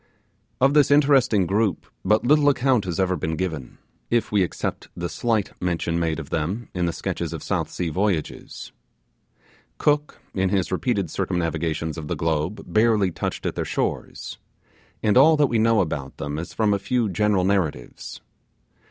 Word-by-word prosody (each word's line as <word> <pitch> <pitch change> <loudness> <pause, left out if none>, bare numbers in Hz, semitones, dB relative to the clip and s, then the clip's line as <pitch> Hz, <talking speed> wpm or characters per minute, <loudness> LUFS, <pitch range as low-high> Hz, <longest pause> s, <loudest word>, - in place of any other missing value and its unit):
Of 135 +2 +4
this 150 -3 +5
interesting 135 -8 +4
group, 100 -1 0 0.2
but 105 +2 +2
little 145 +2 +5
account 130 -5 +2
has 90 -2 -3
ever 95 -1 +2
been 80 0 -2
given, 80 -8 -4 0.3
if 120 -1 +1
we 105 -2 +3
except 90 - -3
the 85 - -2
slight 110 0 -1
mention 85 -1 -1
made 80 -2 0
of 75 -2 -9
them 90 +9 -2
in 90 -1 0
the - - 0
sketches 80 - -4
of - - -6
South - - -1
Sea 90 -2 -3
voyages. 90 -1 -2 1.1
Cook, 150 0 +1
in 95 -1 +1
his 95 -2 0
repeated 100 -2 0
circumnavigations 85 -3 -2
of 75 - -7
the - - -2
globe, 80 +5 -1
barely 110 -4 +2
touched - - -4
at - - -1
their - - -2
shores; - - -3 0.6
and 105 +1 +3
all 155 +3 +6
that 150 - +5
we 120 -4 +1
know 115 -1 +4
about 70 -6 -4
them 75 +2 -4
is 85 - -6
from 105 -2 +1
a 100 - 0
few 120 +2 0
general 100 0 +1
narratives. 90 -10 -2
95 Hz, 170 wpm, -23 LUFS, 85-115 Hz, 1.1 s, all